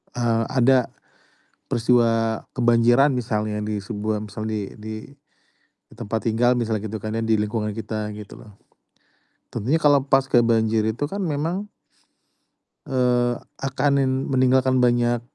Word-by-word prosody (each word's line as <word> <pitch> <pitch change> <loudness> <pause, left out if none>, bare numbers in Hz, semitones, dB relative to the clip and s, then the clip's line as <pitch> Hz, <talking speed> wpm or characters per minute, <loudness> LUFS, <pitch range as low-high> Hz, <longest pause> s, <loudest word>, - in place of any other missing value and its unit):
Eee, 115 -2 0
ada 130 -1 +3 0.8
peristiwa 115 -1 +2 0.2
kebanjiran 120 +3 +4
misalnya 110 -3 -2
di 105 0 -3
sebuah 105 +1 -3
misal 110 +2 -6
di 105 -2 -4
di, 110 0 -7 0.8
di - - -17
tempat 110 +2 -4
tinggal 120 +3 +2
misalnya 110 -3 -1
gitu 110 - -4
kan 110 +1 -5
ya, 115 - -1
di 110 -1 +2
lingkungan 105 0 -2
kita 110 -1 -4
gitu 105 -2 -11
loh. 105 -3 -16 0.9
Tentunya 135 +10 0
kalo 145 -2 +4
paska 135 -2 +3
banjir 110 -1 +2
itu 110 +6 -2
kan 200 +1 -3
memang 165 +6 -2 1.2
eee, 125 -2 +1 0.2
akan 135 +1 0
nin 135 -1 +2
meninggalkan 130 0 +2
banyak 120 -1 +2
115 Hz, 135 wpm, -23 LUFS, 110-130 Hz, 1.2 s, kebanjiran